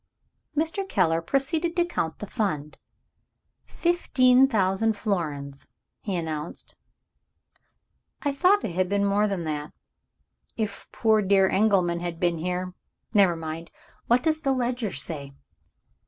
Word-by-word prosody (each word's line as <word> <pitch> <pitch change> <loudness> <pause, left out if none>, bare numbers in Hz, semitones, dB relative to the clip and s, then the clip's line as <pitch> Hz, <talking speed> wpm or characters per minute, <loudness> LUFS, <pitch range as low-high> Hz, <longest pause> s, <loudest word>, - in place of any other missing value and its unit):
Mr. 330 +5 -1
Keller 165 -4 +2
proceeded 310 - 0
to 345 -1 +3
count 165 - -3
the - - -6
Fund. 170 - -3 0.9
"Fifteen 265 -7 +3
thousand 210 -1 +1
florins," 150 -9 -3 0.3
he 200 -3 -3
announced. 160 -2 -5 1.5
"I 290 - +1
thought 370 +8 +3
it - - -2
had 180 +1 0
been 200 0 +1
more 205 +1 +2
than 195 -4 -2
that. 150 -1 -4 0.8
If 215 -3 -4
poor 220 -2 +3
dear 195 -1 +4
Engelman 190 -4 +2
had 170 -1 -5
been 175 -2 +1
here 180 +2 -3 0.4
Never 195 -5 +5
mind! 165 +1 -6 0.4
What 245 +1 +3
does 315 -1 +1
the 275 -3 +1
ledger 245 -4 -1
say?" 140 -1 -4
200 Hz, 125 wpm, -26 LUFS, 170-250 Hz, 1.5 s, Never